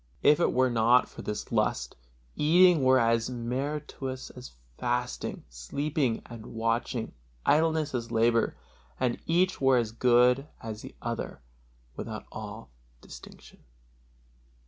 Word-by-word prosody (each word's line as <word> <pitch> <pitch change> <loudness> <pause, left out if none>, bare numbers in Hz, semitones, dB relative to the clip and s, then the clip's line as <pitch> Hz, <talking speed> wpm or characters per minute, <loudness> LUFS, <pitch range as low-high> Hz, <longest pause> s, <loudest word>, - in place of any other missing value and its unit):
If 150 - +6
it - - +3
were 130 0 +2
not 120 +2 +4
for - - -10
this 105 - -5
lust, - - 0 0.4
eating 170 0 +5
were 130 0 +5
as 115 -1 +2
meritorious 130 +2 -4
as 125 - -11 0.2
fasting, 125 0 -2
sleeping 125 - -2
as 120 -1 -9
watching, 115 +1 -2 0.3
idleness 160 -1 +2
as 120 -2 -3
labor, 115 0 +2 0.4
and 120 -2 0
each 180 +1 +2
were 135 -1 +5
as 115 -3 0
good 125 +3 +3
as 110 -1 -7
the - - -11
other 115 - -4 0.5
without - - -6
all - - -8 0.3
distinction. - - -13
125 Hz, 125 wpm, -28 LUFS, 115-140 Hz, 0.5 s, If